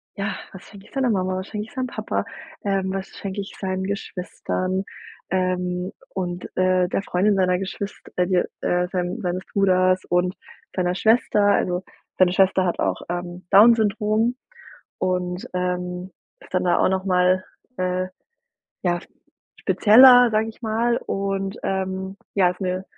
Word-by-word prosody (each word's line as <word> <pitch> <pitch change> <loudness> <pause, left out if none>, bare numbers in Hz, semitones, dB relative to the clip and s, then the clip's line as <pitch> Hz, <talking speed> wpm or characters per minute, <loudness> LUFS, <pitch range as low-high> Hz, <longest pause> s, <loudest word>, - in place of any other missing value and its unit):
ja, 200 -1 -2 0.2
was 190 - -11
schenke 200 -1 -14
ich - - -22
seiner 265 -3 +1
Mama, 185 -3 0
was 190 - -5
schenke 210 0 -4
ich - - -17
seinem 255 -1 -2
Papa, - - -3 0.4
ähm, 195 -1 0
was 195 0 -4
schenke 200 0 -5
ich 195 - -9
seinen 190 -1 -2
Geschwistern, 190 -1 -3 0.5
ähm, 180 -1 -1 0.2
und, 180 -2 -3
äh, 185 -1 +3
der 195 - -1
Freundin 200 +3 +2
seiner 180 -1 +2
Geschwist 195 +1 -5 0.2
äh 180 - +2
d 185 -2 +2 0.2
äh 180 0 +1
sein 180 +4 -2
seines 180 0 -2
Bruders 185 -1 +3
und 180 +1 +1 0.4
seiner 180 -1 0
Schwester? 220 -1 +3
Also, 185 -2 +1 0.3
seine 185 -1 +5
Schwester 190 0 +3
hat 175 - -1
auch, - - 0
ähm, 175 0 -5
Down-Syndrom 220 +2 +4 0.6
und, 180 0 -1
ähm, 180 0 -3 0.3
ist - - -18
dann 185 0 +1
da 175 - +3
auch - - +4
noch 190 0 0
mal, 185 0 +3 0.3
äh, 185 0 -1 0.8
ja, 175 -1 +1 0.6
spezieller, 245 +3 +7
sage 220 +1 +1
ich 225 - -11
mal. 230 +2 +1
Und, 195 0 -2
ähm, 190 0 -2 0.2
ja, 185 -3 +4
ist 180 - -9
'ne 185 0 -2
190 Hz, 155 wpm, -23 LUFS, 180-200 Hz, 0.8 s, spezieller